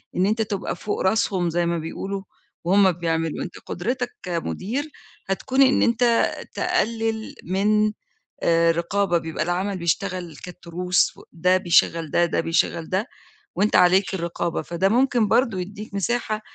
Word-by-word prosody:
إن 180 - +2
أنت 215 +3 +1
تبقى 205 -4 -2
فوق 205 +4 -3
راسهم 190 -3 +1
زي 170 +1 0
ما 170 0 0
بيقولوا، 195 +5 -5 0.4
وهُم 190 +2 +4
بيعملوا، 165 -2 -2
أنت 180 - -8
قدرَتك 245 +7 -3
كمدير، 195 - -3 0.4
هتكون 260 +8 +1
إن 265 0 +5
أنت 235 +1 +2 0.5
تقلّل 225 -11 -1
من 210 +3 +2 0.5
آآ 165 0 +4
رقابة 175 +2 0
بيبقى 160 -2 -3
العمل 185 +3 -1
بيشتغل 170 0 -2
كالتروس، 180 0 -1
و - - -14
ده 180 +2 +3
بيشغّل 170 -3 +2
ده، 175 - +3
ده 170 - -1
بيشغّل 165 0 0
ده، 195 +6 0 0.5
وأنت 210 +2 +1
عليك 185 +2 +4
الرقابة، 170 -1 -2
فده 175 +3 0
ممكن 245 -1 +3
برضه 230 -5 +2
يدّيك 205 +3 -7
مساحة، 215 +1 -1
185 Hz, 140 wpm, -23 LUFS, 170-215 Hz, 0.5 s, إن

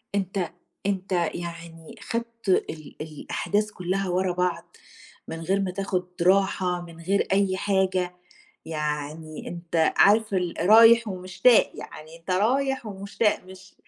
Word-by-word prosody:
أنت 190 -2 -2 0.3
أنت 195 -1 -2 0.2
يعني 170 -1 -8
خدت 230 -2 -5
ال 185 - +2
ال 155 -2 -11
الأحداث 205 +7 -2
كلّها 185 +1 -2
ورا 180 +1 +1
بعض، 180 0 -2 0.5
من 165 0 -6
غير 195 +4 0
ما 185 -2 -1
تاخذ 190 -1 -1 0.2
راحة 185 -1 +2
من 170 -1 -12
غير 195 +4 +1
أي 195 -1 +2
حاجة، 185 -2 0 0.5
يعني 150 0 -4
أنت 170 -2 0
عارف 215 0 +4
ال 180 -2 -1
رايح 225 +4 +7
ومشتاق 190 +5 +3
يعني 155 +2 -10
أنت 170 +3 -10
رايح 260 +6 +1
ومشتاق 200 +1 -1
مش 190 +1 -14
185 Hz, 130 wpm, -25 LUFS, 170-200 Hz, 0.5 s, رايح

